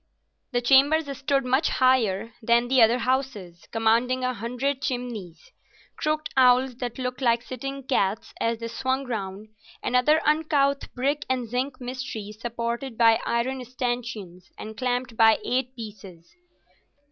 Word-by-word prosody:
The 245 -1 0
chambers 280 +3 +4
stood 275 0 0
much 260 +5 +2
higher 230 -5 +2
than 235 +1 +2
the 260 -1 +4
other 230 +2 +5
houses, 250 -9 -2
commanding 230 +3 +2
a 255 0 0
hundred 250 +4 -2
chimneys—crooked 245 - -5
cowls 255 -1 +4
that 245 -2 -5
looked 250 0 -4
like 235 -2 +2
sitting 275 +2 -6
cats 215 -5 -1
as 230 0 +1
they 230 0 -5
swung 260 +3 -2
round, 210 -3 -5 0.3
and 250 - -1
other 300 +5 +4
uncouth 300 -2 +1
brick 280 +4 0
and 255 -2 -1
zinc 255 +3 -3
mysteries 245 -4 -6
supported 235 +1 -4
by 225 -1 +5
iron 255 +2 -1
stanchions 240 -7 -5
and 220 0 -8
clamped 250 0 -2
by 225 -1 +6
8 255 +1 -1
pieces. 200 -7 -10
245 Hz, 135 wpm, -25 LUFS, 225-265 Hz, 0.3 s, by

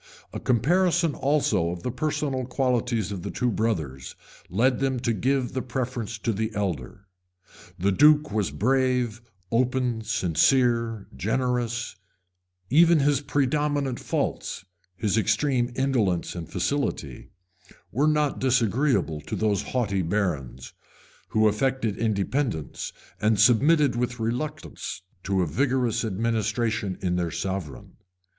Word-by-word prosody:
A - - -4
comparison 170 - +2
also 130 - +1
of 85 0 -6
the 125 - -2
personal 140 -1 -1
qualities 125 -5 0
of 95 -3 -4
the - - -5
two 125 -1 0
brothers 80 - -2 0.3
led 120 +7 +2
them 135 -2 0
to 115 - +1
give 130 +4 0
the 130 - -1
preference 125 -3 -3
to 110 +2 -1
the 110 +2 -1
elder. 95 -3 -3 0.7
The 95 +3 +1
duke 150 +6 +5
was 105 -3 0
brave, 125 -1 +1 0.3
open, 125 -1 +1
sincere, 115 - +2
generous: 120 +2 -1 0.7
even 165 +3 +6
his 140 -1 +2
predominant 145 -1 0
faults, - - -3 0.3
his 105 +4 +1
extreme 120 +3 +1
indolence 115 -10 0
and 85 -2 -7
facility, 90 - -2 0.6
were 145 +6 +2
not 150 -2 +1
disagreeable 125 - +1
to - - -5
those 105 -2 +1
haughty 100 -7 -1
barons, 80 -10 -2 0.5
who 110 0 +3
affected 115 0 0
independence, 110 - -1 0.3
and 110 -1 +2
submitted 135 +6 +4
with 125 0 -2
reluctance 120 -3 -4 0.2
to 95 -2 +1
a - - +1
vigorous 125 - 0
administration 110 -1 -1
in 90 -1 +1
their 85 -1 0
sovereign. 85 -6 -5
115 Hz, 120 wpm, -25 LUFS, 100-130 Hz, 0.7 s, even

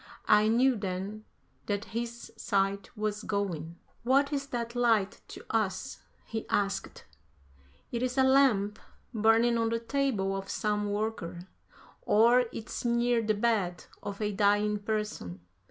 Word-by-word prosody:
I 210 0 +5
knew 250 +4 +4
then 200 +1 -4 0.4
that 205 0 -1
his 235 0 -5
sight 200 -1 0
was 210 0 -2
going. 175 -6 -3 0.2
"What 275 +4 +2
is 280 -1 -2
that 235 -2 -4
light 225 -5 +2
to - - -11
us?" 215 +3 -1 0.3
he 220 -1 -5
asked; 200 -1 -1 0.9
"it 235 - -2
is 255 +1 -1
a 265 - +5
lamp 250 -6 +3 0.3
burning 225 +2 +4
on 225 0 +1
the 230 0 0
table 230 -6 0
of 195 0 -5
some 210 -1 -1
worker, 205 -5 -3 0.6
or 235 +4 +5
it's 220 - -6
near 235 0 +2
the 215 -1 +1
bed 205 -6 0 0.2
of 200 -1 -6
a 210 - 0
dying 205 +1 +2
person. 210 - -3
215 Hz, 140 wpm, -29 LUFS, 200-235 Hz, 0.9 s, I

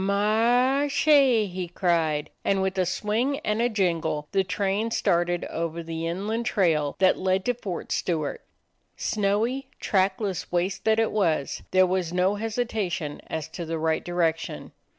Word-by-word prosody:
"Mar 225 +6 +3
r - - +1
r 290 - +1
che!" 275 -6 +4
he 185 -2 -5
cried, 165 -4 0
and 195 - +1
with 190 0 -1
a 185 - +2
swing 220 +9 0
and 215 -4 0
a 240 - +2
jingle 170 -8 -1
the 195 -1 +2
train 200 +3 -1
started 175 -4 +1
over 165 0 -4
the 165 0 -4
inland 215 +7 -2
trail 155 -7 +1
that 190 0 +3
led 190 0 +1
to 245 - +2
Fort 195 -7 -6
Stewart. 160 -5 -1 0.6
Snowy, 220 +6 0
track 190 -1 +1
less 195 -5 -3
waste 180 +2 -1
that 220 0 +4
it 225 -1 +2
was, 170 -9 0
there 185 0 +5
was 180 -2 -1
no 180 +2 +2
hesitation 205 -8 -3
as 160 -2 -4
to 175 - -6
the 165 0 -3
right 160 0 0
direction. 165 -2 -2
190 Hz, 165 wpm, -26 LUFS, 170-220 Hz, 0.6 s, there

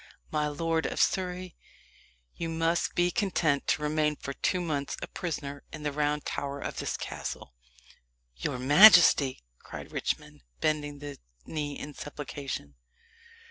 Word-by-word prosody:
"My 150 -1 +1
lord 160 +2 0
of - - -4
Surrey, 180 -1 0 0.8
you 165 - -4
must 165 +1 0
be 175 0 +3
content 175 -10 +1
to 150 - +1
remain 150 0 +1
for 140 - -6
two 180 - 0
months 150 -5 -2
a - - -4
prisoner 145 -5 -5
in 155 - -8
the 150 - 0
Round 150 0 0
Tower 140 0 -3
of - - -5
this - - -2
castle." - - -6 0.8
"Your 60 - -3
majesty!" 145 - +7 0.2
cried - - -9
Richmond, - - -3 0.2
bending 145 -1 0
the 145 0 -8 0.3
knee 145 -2 -3
in 150 - -7
supplication. 140 - -6
150 Hz, 140 wpm, -29 LUFS, 145-165 Hz, 0.8 s, majesty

